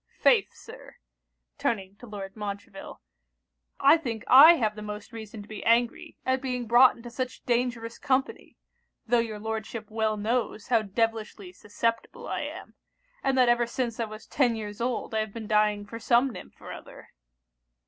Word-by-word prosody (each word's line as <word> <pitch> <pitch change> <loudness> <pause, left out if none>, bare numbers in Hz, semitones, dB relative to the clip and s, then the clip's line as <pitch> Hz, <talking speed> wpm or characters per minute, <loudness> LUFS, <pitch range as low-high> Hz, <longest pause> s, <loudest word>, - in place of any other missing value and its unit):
Faith, - - +4
Sir,' - - -13 0.6
(turning 195 -4 -2
to 245 - -12
Lord 195 -2 -8
Montreville,) 200 -2 -7 0.8
'I 325 - +6
think 235 -8 -5
I 290 +6 +9
have 215 -7 0
the 210 - -8
most 210 0 -7
reason 220 -1 -8
to - - -16
be 215 - -8
angry 235 +1 +1
at 260 0 +1
being 250 -2 -3
brought 240 +3 +6
into 235 0 -11
such 255 +1 -5
dangerous 235 -1 -1
company; 270 -2 -1 0.5
tho' 240 +1 +3
your 225 -2 -2
Lordship 220 0 -5
well 220 -1 0
knows 220 +1 -2
how 230 -3 +4
devilishly 215 -2 -2
susceptible 230 +4 -3
I - - -2
am, - - -7 0.5
and 270 -1 +1
that 250 -1 +5
ever 240 0 +3
since 235 -1 -3
I 230 - 0
was 215 0 -10
ten 245 -5 +1
years 210 0 -6
old 245 -1 -2
I 220 - +1
have 215 -2 -3
been 225 -1 -6
dying 210 -1 +2
for 230 +3 -8
some 240 +3 +3
nymph - - -12
or - - -9
other.' - - -12
225 Hz, 170 wpm, -27 LUFS, 210-245 Hz, 0.8 s, I